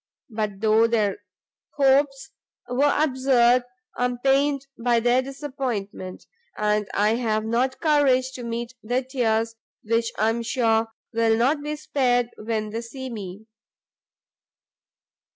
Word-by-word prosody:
But 210 Hz, -3 st, -3 dB
though 220 Hz, +1 st, +4 dB
their 210 Hz, -4 st, 0 dB, 0.6 s
hopes 275 Hz, -1 st, +2 dB, 0.4 s
were 270 Hz, +4 st, +2 dB
absurd, 255 Hz, -4 st, +3 dB, 0.3 s
I 245 Hz, -, 0 dB
am 250 Hz, 0 st, -2 dB
pained 275 Hz, +2 st, +2 dB
by 235 Hz, 0 st, +2 dB
their 245 Hz, +2 st, +3 dB
disappointment, 255 Hz, -9 st, -5 dB, 0.3 s
and 210 Hz, -1 st, 0 dB
I 210 Hz, +1 st, +3 dB
have 220 Hz, -3 st, 0 dB
not 245 Hz, +4 st, 0 dB
courage 275 Hz, -5 st, +3 dB
to 250 Hz, -, -8 dB
meet 235 Hz, +1 st, -4 dB
their 245 Hz, +4 st, -1 dB
tears, 230 Hz, -3 st, 0 dB, 0.3 s
which 230 Hz, +1 st, 0 dB
I 215 Hz, +1 st, +2 dB
am 230 Hz, +1 st, -1 dB
sure 225 Hz, -2 st, +1 dB, 0.3 s
will 225 Hz, 0 st, +2 dB
not 275 Hz, +6 st, +2 dB
be 300 Hz, +1 st, -3 dB
spared 245 Hz, -5 st, 0 dB
when 215 Hz, -1 st, -3 dB
they 225 Hz, +2 st, -3 dB
see 260 Hz, +2 st, -7 dB
me." 200 Hz, -1 st, -7 dB
240 Hz, 130 wpm, -24 LUFS, 225-265 Hz, 0.6 s, though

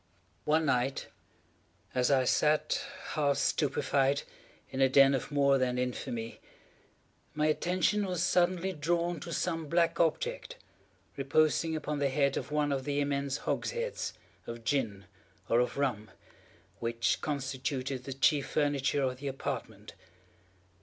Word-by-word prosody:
One 155 Hz, +1 st, +3 dB
night 135 Hz, -1 st, 0 dB, 0.8 s
as 125 Hz, -1 st, +2 dB
I 135 Hz, -2 st, +4 dB
sat, 150 Hz, +4 st, +2 dB, 0.3 s
half 145 Hz, -2 st, +1 dB
stupefied, 140 Hz, -1 st, +1 dB, 0.5 s
in 135 Hz, 0 st, -2 dB
a 135 Hz, -, +5 dB
den 135 Hz, +1 st, +6 dB
of 135 Hz, -, -2 dB
more 140 Hz, -1 st, +3 dB
than 125 Hz, -1 st, 0 dB
infamy, 120 Hz, -2 st, -3 dB, 1.0 s
my 150 Hz, 0 st, +1 dB
attention 180 Hz, +6 st, +1 dB
was 180 Hz, -3 st, -1 dB
suddenly 180 Hz, +1 st, +2 dB
drawn 170 Hz, +2 st, 0 dB
to 170 Hz, -, -7 dB
some 165 Hz, -2 st, -2 dB
black 170 Hz, +1 st, +2 dB
object, -, -, 0 dB, 0.6 s
reposing 155 Hz, +3 st, +2 dB
upon 150 Hz, -1 st, -3 dB
the 140 Hz, -1 st, +2 dB
head 140 Hz, 0 st, +1 dB
of -, -, -4 dB
one 150 Hz, -1 st, +1 dB
of 135 Hz, -1 st, -1 dB
the 145 Hz, +1 st, -1 dB
immense 140 Hz, 0 st, -1 dB
hogsheads 475 Hz, +1 st, -2 dB, 0.3 s
of 115 Hz, 0 st, -7 dB
gin, 115 Hz, -8 st, -1 dB, 0.4 s
or 115 Hz, -, +3 dB
of 125 Hz, -, 0 dB
rum, 115 Hz, -7 st, -1 dB, 0.7 s
which 115 Hz, 0 st, 0 dB
constituted 135 Hz, -2 st, -3 dB
the 135 Hz, -, -4 dB
chief 135 Hz, +1 st, +2 dB
furniture 145 Hz, -1 st, +1 dB
of 130 Hz, -1 st, -1 dB
the 140 Hz, +2 st, -6 dB
apartment. 135 Hz, 0 st, -5 dB
140 Hz, 135 wpm, -31 LUFS, 130-155 Hz, 1.0 s, den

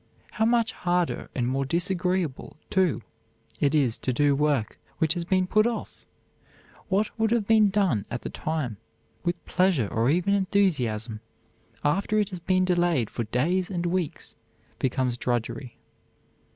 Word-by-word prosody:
How 220 Hz, -, +1 dB
much 230 Hz, -1 st, +2 dB
harder 175 Hz, -1 st, -1 dB
and 120 Hz, -2 st, 0 dB
more 135 Hz, +2 st, 0 dB
disagreeable, 175 Hz, -1 st, -1 dB
too, 185 Hz, -6 st, +2 dB, 0.6 s
it 145 Hz, +1 st, +2 dB
is 130 Hz, -7 st, +2 dB
to 130 Hz, -, -1 dB
do 145 Hz, +3 st, +3 dB
work 140 Hz, -6 st, 0 dB, 0.2 s
which 160 Hz, -1 st, +2 dB
has 175 Hz, -2 st, -3 dB
been 185 Hz, +1 st, +2 dB
put 215 Hz, +4 st, +3 dB
off! 235 Hz, -2 st, -5 dB, 0.8 s
What 205 Hz, +2 st, +1 dB
would 220 Hz, 0 st, +3 dB
have 230 Hz, -2 st, +1 dB
been 215 Hz, -1 st, +5 dB
done 190 Hz, -, +1 dB
at 120 Hz, -, -5 dB
the -, -, -5 dB
time 150 Hz, -9 st, -3 dB, 0.5 s
with 175 Hz, 0 st, -2 dB
pleasure 180 Hz, -, +2 dB
or 115 Hz, +3 st, +2 dB
even 180 Hz, +6 st, +2 dB
enthusiasm, 145 Hz, -, +1 dB, 0.6 s
after 195 Hz, +8 st, +1 dB
it 210 Hz, -1 st, +1 dB
has 185 Hz, -3 st, -6 dB
been 185 Hz, +2 st, +2 dB
delayed 175 Hz, -, +1 dB
for 120 Hz, -, -3 dB
days 170 Hz, +12 st, 0 dB
and 175 Hz, -3 st, -2 dB
weeks, 175 Hz, -3 st, -2 dB, 0.4 s
becomes 130 Hz, -2 st, 0 dB
drudgery. 120 Hz, +1 st, -3 dB
175 Hz, 150 wpm, -26 LUFS, 130-190 Hz, 0.8 s, been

